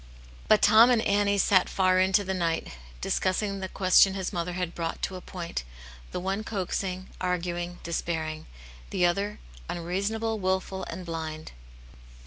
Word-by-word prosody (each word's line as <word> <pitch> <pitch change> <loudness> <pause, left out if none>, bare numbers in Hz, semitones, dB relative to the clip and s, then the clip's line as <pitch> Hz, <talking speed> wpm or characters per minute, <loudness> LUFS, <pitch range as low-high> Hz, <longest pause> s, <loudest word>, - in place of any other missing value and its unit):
But 215 -1 +5
Tom 220 +3 +8
and 235 -3 +3
Annie 200 0 +2
sat 190 -1 +4
far 185 -1 +3
into 190 +2 +3
the 190 0 -2
night, 170 -3 -1 0.3
dis - - 0
cussing 195 +1 0
the 190 -1 -4
question 190 0 +5
his 190 -2 -3
mother 175 0 -2
had 180 -1 -3
brought 165 -1 -3
to 190 - -2
a 180 - -7
point, 170 - -5 0.5
the - - -3
one 195 +3 -2
coaxing, 190 -2 -3
arguing, 175 -1 -2
despairing; 160 -2 -3 0.4
the 180 - +2
other 200 +4 0 0.3
unreasonable, 200 +6 -2
wilful, 190 0 -1
and 180 +2 -7
blind. 160 -2 -5
185 Hz, 150 wpm, -27 LUFS, 175-200 Hz, 0.5 s, Tom